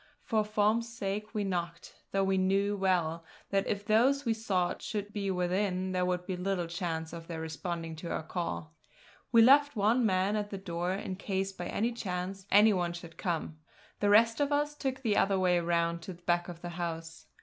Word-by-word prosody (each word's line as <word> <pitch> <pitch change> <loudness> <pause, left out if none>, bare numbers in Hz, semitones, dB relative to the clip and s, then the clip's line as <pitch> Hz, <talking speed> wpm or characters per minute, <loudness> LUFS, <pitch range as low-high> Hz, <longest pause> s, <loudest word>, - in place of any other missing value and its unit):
For 220 -2 +1
form's 215 +2 +1
sake 210 0 -4
we 210 - 0
knocked, 170 -3 -3 0.2
though 195 0 +2
we 190 0 +2
knew 195 +2 +2
well 175 -4 +1 0.3
that 195 0 +1
if 205 -1 -2
those 260 +7 +3
we 230 - +2
sought 195 -5 -1
should 205 -1 -4
be 200 -2 -2
within 185 +1 0
there 180 -1 +1
would 180 0 -1
be 185 - -3
little 180 -1 -1
chance 165 -1 -4
of 165 -1 -8
their 165 -2 -5
responding 165 +1 -4
to 170 +2 -6
our - - -2
call. 165 -1 -4 0.6
We 230 -1 +7
left 285 +4 +6
one 220 +4 +3
man 195 -1 +2
at 205 -1 -2
the 195 - -5
door, 175 -1 -3
in 190 -1 -4
case 195 -1 -2
by 175 -2 -6
any 230 +3 0
chance 190 -3 -4
any 210 +2 +6
one 175 -2 0
should 170 -1 -9
come; 165 -4 -3 0.4
the 205 - +2
rest 225 +3 +5
of 290 0 +1
us 295 +1 +1
took 265 -2 -3
the 215 -4 +2
other 195 0 +3
way 180 -2 +3
round 170 0 0
to 185 +3 -7
the 175 0 -19
back 175 0 +1
of 170 -1 -9
the 175 - -4
house. 165 -2 -5
190 Hz, 205 wpm, -31 LUFS, 175-210 Hz, 0.6 s, We